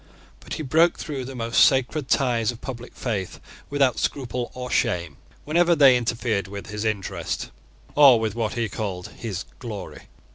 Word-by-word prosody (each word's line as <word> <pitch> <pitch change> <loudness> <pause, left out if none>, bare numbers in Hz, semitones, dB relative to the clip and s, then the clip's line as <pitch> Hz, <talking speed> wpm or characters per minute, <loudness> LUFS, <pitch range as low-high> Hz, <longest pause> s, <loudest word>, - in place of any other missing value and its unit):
But - - -7
he 155 - -4
broke 160 +5 +3
through 140 -5 -5
the 135 +1 -7
most 115 -1 +3
sacred 135 +2 +2
ties 120 -5 +2
of 120 - -11
public 120 -2 -8
faith 100 -7 -3 0.3
without 140 -4 +2
scruple 125 -3 -2
or 125 0 -5
shame, 85 -5 0 0.3
whenever 170 +3 +3
they 140 -4 +7
interfered 115 -4 -1
with 100 +1 -8
his 105 0 -4
interest, 105 -4 -3 0.4
or 140 -5 +7
with 110 -2 -1
what 115 -1 -2
he 115 -1 -1
called 95 -4 -5
his 100 -5 -6
glory. 105 -6 -8
120 Hz, 160 wpm, -24 LUFS, 105-135 Hz, 0.4 s, they